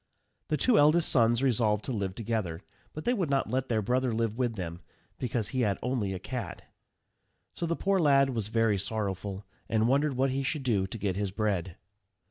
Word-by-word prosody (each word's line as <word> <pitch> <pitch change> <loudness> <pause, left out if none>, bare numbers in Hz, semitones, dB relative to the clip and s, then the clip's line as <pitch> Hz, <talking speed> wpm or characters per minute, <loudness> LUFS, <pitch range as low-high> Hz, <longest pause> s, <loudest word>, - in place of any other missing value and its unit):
The 155 - 0
two 245 +4 +4
eldest 155 +3 +5
sons 120 0 +3
resolved 110 -5 +2
to - - -3
live 100 -5 -2
together; 105 -6 -3 0.3
but 155 - -8
they 245 - +3
would 185 - -1
not 135 -5 0
let 130 +1 0
their 110 -3 0
brother 125 +3 +1
live 115 -1 -1
with 120 -2 -1
them, 85 -3 -5 0.4
because 115 -4 -1
he 130 - -1
had 105 -4 +1
only 125 -6 -1
a 95 - -3
cat. 120 +6 -6 0.9
So 170 - -3
the 170 - 0
poor 195 +1 +1
lad 140 -4 +4
was 110 -5 -2
very 115 -2 +2
sorrowful, 100 -1 -3 0.2
and 110 0 +2
wondered 140 +2 +2
what 130 +1 +1
he 135 +1 -1
should 140 +1 -2
do 105 -7 +1
to 105 - -7
get 100 -3 -1
his 100 -1 -1
bread. 95 -4 -2
115 Hz, 200 wpm, -29 LUFS, 100-135 Hz, 0.9 s, eldest